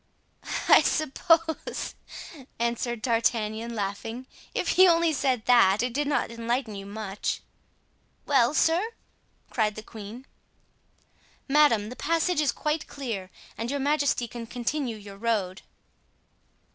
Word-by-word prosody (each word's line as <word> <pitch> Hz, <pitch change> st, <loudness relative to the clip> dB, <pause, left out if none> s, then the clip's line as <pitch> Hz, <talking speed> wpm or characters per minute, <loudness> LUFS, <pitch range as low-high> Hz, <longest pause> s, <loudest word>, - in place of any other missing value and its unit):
'" -, -, -27 dB, 0.2 s
"I -, -, +8 dB
suppose," 320 Hz, +2 st, +1 dB, 0.6 s
answered 235 Hz, 0 st, -2 dB
D'Artagnan, 230 Hz, -1 st, 0 dB
laughing, 220 Hz, +4 st, -4 dB, 0.3 s
"if -, -, 0 dB
he 375 Hz, 0 st, +6 dB
only 335 Hz, -1 st, +4 dB
said 260 Hz, -5 st, 0 dB
that, 220 Hz, -4 st, +5 dB
it 250 Hz, -1 st, -2 dB
did 290 Hz, +2 st, 0 dB
not 285 Hz, -5 st, 0 dB
enlighten 230 Hz, 0 st, -2 dB
you 195 Hz, -1 st, -7 dB
much." 205 Hz, -1 st, -4 dB, 0.8 s
"Well, 270 Hz, -1 st, +3 dB
sir!" 330 Hz, +5 st, +3 dB, 0.7 s
cried 215 Hz, -3 st, +1 dB
the 215 Hz, -, -7 dB
queen. 220 Hz, +4 st, -10 dB, 1.2 s
"Madame, 270 Hz, -8 st, +4 dB
the 250 Hz, -, -8 dB
passage 330 Hz, +2 st, +1 dB
is 290 Hz, -5 st, +2 dB
quite 300 Hz, +5 st, -2 dB
clear 225 Hz, -9 st, -5 dB, 0.3 s
and 230 Hz, +1 st, -2 dB
your 285 Hz, +1 st, -1 dB
majesty 285 Hz, -3 st, +1 dB
can 230 Hz, 0 st, -8 dB
continue 245 Hz, 0 st, -2 dB
your 200 Hz, -1 st, -11 dB
road." 205 Hz, -4 st, -1 dB
240 Hz, 125 wpm, -27 LUFS, 220-290 Hz, 1.2 s, I